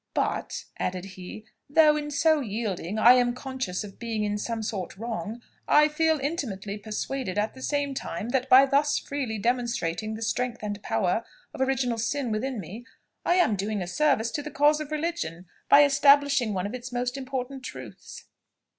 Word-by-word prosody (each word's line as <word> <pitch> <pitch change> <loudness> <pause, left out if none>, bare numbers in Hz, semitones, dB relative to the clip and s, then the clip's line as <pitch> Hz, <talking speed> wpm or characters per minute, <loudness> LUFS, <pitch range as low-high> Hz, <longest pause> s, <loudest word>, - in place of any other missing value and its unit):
"But," - - -1 0.2
added 180 0 -2
he, 185 +4 -9 0.2
"though 305 0 +6
in 295 -1 -3
so 310 +2 +3
yielding, 210 - -3
I 230 +3 +8
am 245 -1 +2
conscious 255 -8 -4
of 200 -2 -11
being 225 -2 -2
in 210 0 -1
some 225 0 -3
sort 195 -4 -4
wrong, 230 +1 -5 0.2
I 300 +1 +5
feel 320 0 +2
intimately 220 - -3
persuaded 215 +1 -4
at 210 +1 0
the 260 - -12
same 285 0 -1
time, 215 -4 -5
that 260 +1 0
by 265 +1 +8
thus 285 +2 +2
freely 265 -6 -3
demonstrating 225 -3 -1
the 225 - -5
strength 245 0 -2
and 205 -1 -4
power 220 0 0 0.3
of - - -6
original 260 -3 0
sin 240 +2 -1
within 240 +3 -2
me, 200 +6 -8 0.4
I 350 - +2
am 355 - +3
doing 205 +2 -2
a 180 - -3
service 235 +2 +1
to 295 - -2
the 300 - -6
cause 300 +1 +3
of 305 -2 -5
religion, 305 - -3 0.2
by 285 +1 +8
establishing 280 -3 +4
one 185 0 -1
of 205 - -4
its 250 0 -6
most 245 +1 -2
important 265 0 -4
truths." - - -9
245 Hz, 180 wpm, -26 LUFS, 215-280 Hz, 0.4 s, I